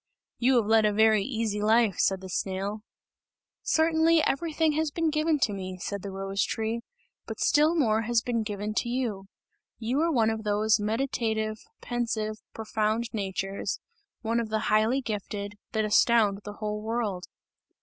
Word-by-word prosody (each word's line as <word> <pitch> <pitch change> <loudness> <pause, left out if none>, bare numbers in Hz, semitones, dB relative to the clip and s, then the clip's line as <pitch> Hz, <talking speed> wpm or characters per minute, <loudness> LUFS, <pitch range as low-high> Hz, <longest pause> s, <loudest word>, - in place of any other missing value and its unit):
"You 255 +2 +3
have 235 -3 +3
led 220 +1 +4
a 210 - +3
very 220 0 +4
easy 220 -4 -2
life!" 220 -2 +3
said 190 -1 +2
the 190 - -8
snail. 195 +3 -3 0.8
"Certainly, 320 0 +3
everything 320 +2 +1
has 315 +1 0
been 325 +1 0
given 310 +1 +2
to 210 - +2
me," 185 -1 -5
said 200 +2 -4
the 200 - -6
rose 195 +1 -2
tree, 225 +1 -2 0.5
"but - - -6
still 305 +3 +3
more 225 -8 +2
has 230 0 +1
been 235 -2 0
given 210 0 -4
to 240 - 0
you. 235 -6 -2 0.5
You 240 +4 -1
are 330 +1 +2
one 225 -6 +3
of 220 0 -4
those 210 +1 +2
meditative, 220 -1 -1 0.2
pensive, 225 -3 -2
profound 220 +1 -1
natures, 195 -1 -3 0.4
one 230 +1 +1
of 230 -2 -3
the 215 0 -1
highly 220 +5 +3
gifted, 205 -3 -4 0.2
that 220 -1 +1
astound 210 -1 +4
the 205 - -6
whole 210 0 -4
world!" 215 -5 -2
220 Hz, 160 wpm, -27 LUFS, 205-240 Hz, 0.8 s, led